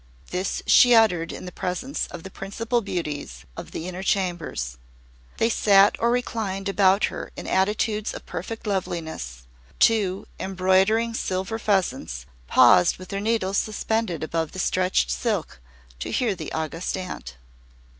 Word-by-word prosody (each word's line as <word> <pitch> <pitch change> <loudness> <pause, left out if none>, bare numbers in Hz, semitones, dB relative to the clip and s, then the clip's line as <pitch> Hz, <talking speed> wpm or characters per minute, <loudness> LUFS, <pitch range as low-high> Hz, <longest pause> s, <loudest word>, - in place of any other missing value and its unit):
This 185 +2 -2
she 245 -1 +7
uttered 180 -7 +3
in - - -8
the 180 - -7
presence 185 +13 -3
of 175 -2 -9
the 190 - -9
principal 230 +6 -2
beauties 150 - -5
of - - -8
the 165 - -6
Inner 185 0 -5
Chambers. 175 - -2 0.6
They 225 - +3
sat 200 -3 +5
or 235 - +2
reclined 220 -5 -2
about 195 0 +3
her - - -6
in - - -6
attitudes 210 +2 0
of - - -9
perfect 225 +7 -6
loveliness. 160 - -3 0.3
Two, 200 -4 +3
embroidering 190 +5 +2
silver 190 +1 -2
pheasants, 135 - -1 0.2
paused 90 - +6
with 185 -1 -11
their 200 0 -3
needles 205 -3 +1
suspended 215 -5 -2
above 160 0 -2
the - - -8
stretched 180 - +1
silk, 60 0 -2 0.4
to - - -4
hear 240 -5 +1
the 160 -5 -7
August 160 +4 -3
Aunt. 65 - -7
190 Hz, 145 wpm, -24 LUFS, 170-215 Hz, 0.6 s, she